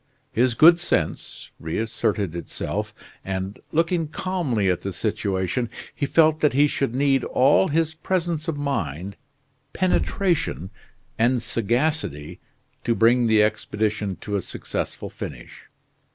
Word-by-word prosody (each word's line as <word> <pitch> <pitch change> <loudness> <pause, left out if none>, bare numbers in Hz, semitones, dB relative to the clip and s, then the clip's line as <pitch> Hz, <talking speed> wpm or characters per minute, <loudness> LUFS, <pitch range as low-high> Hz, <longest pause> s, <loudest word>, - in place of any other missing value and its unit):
His 120 +1 +2
good 170 +5 +7
sense 175 - -2
reasserted 100 0 -2
itself, 85 - -4 0.3
and, 95 +1 -4
looking 165 0 +1
calmly 155 - -1
at 90 -2 +1
the 100 - -4
situation, 100 +3 -1 0.2
he 140 - -2
felt 155 0 +4
that 150 -4 +3
he 145 +3 +5
should 135 -4 -1
need 135 -1 +2
all 140 +8 +4
his 160 +1 +1
presence 165 -1 -2
of 160 -3 -2
mind, 100 - -3 0.6
penetration, 175 - 0 0.5
and 120 +2 +3
sagacity 115 - -1 0.4
to 115 - +1
bring 120 +1 +4
the 110 -1 +5
expedition 105 -2 -1
to 105 - -3
a 100 - 0
successful - - -5
finish. - - -9
120 Hz, 125 wpm, -24 LUFS, 100-155 Hz, 0.6 s, good